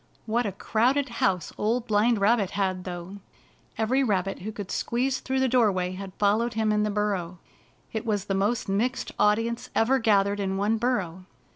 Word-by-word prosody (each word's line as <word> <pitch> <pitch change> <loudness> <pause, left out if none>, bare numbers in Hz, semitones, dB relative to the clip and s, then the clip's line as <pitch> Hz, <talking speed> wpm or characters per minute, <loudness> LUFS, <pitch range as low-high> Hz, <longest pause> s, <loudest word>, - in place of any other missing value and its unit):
What 235 +1 0
a - - -2
crowded 250 +8 +1
house 190 -7 -1
Old 230 +3 0
Blind 220 +1 +2
Rabbit 205 -1 +2
had, 185 -2 -1
though! 180 +2 -6 0.6
Every 245 +5 +2
rabbit 195 -5 0
who 215 +4 -5
could 205 -3 -7
squeeze 255 +2 -1
through 265 0 -2
the 265 - +3
doorway 205 -8 +2
had 185 0 -8
followed 215 +3 +1
him 220 -1 +1
in 210 0 +2
the 210 - +1
burrow. 200 -4 -2 0.6
It 220 - -2
was 205 -4 -1
the 195 - -2
most 205 +5 0
mixed 230 +7 -1
audience 225 +3 +1
ever 260 +4 +3
gathered 205 -3 +2
in 195 -1 -1
one 210 +3 +1
burrow. 190 -7 -2
210 Hz, 175 wpm, -26 LUFS, 195-235 Hz, 0.6 s, the